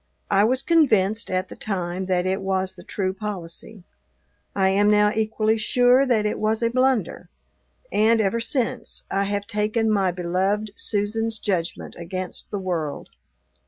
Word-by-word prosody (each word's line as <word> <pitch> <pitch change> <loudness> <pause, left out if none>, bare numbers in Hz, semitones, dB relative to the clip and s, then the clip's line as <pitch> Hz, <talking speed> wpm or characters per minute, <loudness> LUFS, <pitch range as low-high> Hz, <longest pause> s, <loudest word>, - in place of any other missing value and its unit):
I 200 0 +5
was 255 +3 +1
convinced, 225 - +3
at 185 0 -1
the - - -9
time, 185 -2 -3
that 180 -1 +1
it 190 +1 0
was 190 -1 -1
the - - -13
true 190 -2 -2
policy. 195 0 -6 0.7
I 190 -1 +3
am 205 +2 +3
now 210 0 +4
equally 220 0 +1
sure 250 +4 +4
that 220 -4 +2
it 210 - -1
was 220 +2 0
a 230 - +2
blunder, 250 -9 0 0.6
and, 225 +2 +3
ever 220 +2 +1
since, 250 +1 -2
I 195 0 +1
have 200 0 -2
taken 215 +2 0
my 195 -3 +2
beloved 185 +4 -1
Susan's 220 +2 -1
judgment 180 -5 -2
against 185 +2 -5
the 205 - -3
world. 170 -6 -3
205 Hz, 155 wpm, -23 LUFS, 185-225 Hz, 0.7 s, I